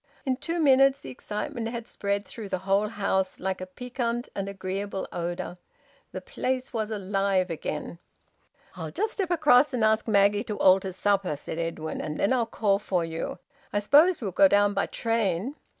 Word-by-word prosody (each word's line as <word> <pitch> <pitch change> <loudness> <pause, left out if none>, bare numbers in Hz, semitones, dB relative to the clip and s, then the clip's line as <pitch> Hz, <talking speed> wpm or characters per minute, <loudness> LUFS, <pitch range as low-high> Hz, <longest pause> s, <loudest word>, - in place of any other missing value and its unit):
In 260 -2 0
two 330 +5 -3
minutes 275 -2 +5
the 130 - -9
excitement 210 - -4
had 235 -1 -6
spread 200 0 -2
through 215 -4 -8
the - - -1
whole 200 +2 +2
house, 195 -3 -1
like 190 0 -2
a 185 - -5
piquant 240 +3 -3
and 195 0 -3
agreeable 195 0 -4
odour. 175 +1 -4 0.5
The - - -6
place 260 - -3
was 220 -2 -2
alive 195 -3 0
again. 160 +1 -5 0.8
"I'll - - -5
just 435 +2 -2
step 385 -4 -2
across 295 -5 +4
and 230 - 0
ask 220 +1 +2
Maggie 205 0 +3
to 210 -2 -4
alter 190 0 +4
supper," 190 -3 0
said 160 +3 -6
Edwin, 165 -1 -3
"and 155 0 -4
then 200 - +2
I'll 240 -3 +1
call 200 -3 +1
for 180 -5 -1
you. 165 0 -4 0.3
I - - -1
suppose 300 - +5
we'll 200 -4 -2
go 195 +2 +6
down 205 +1 +3
by 200 - 0
train." 225 - -1
205 Hz, 180 wpm, -27 LUFS, 190-240 Hz, 0.8 s, go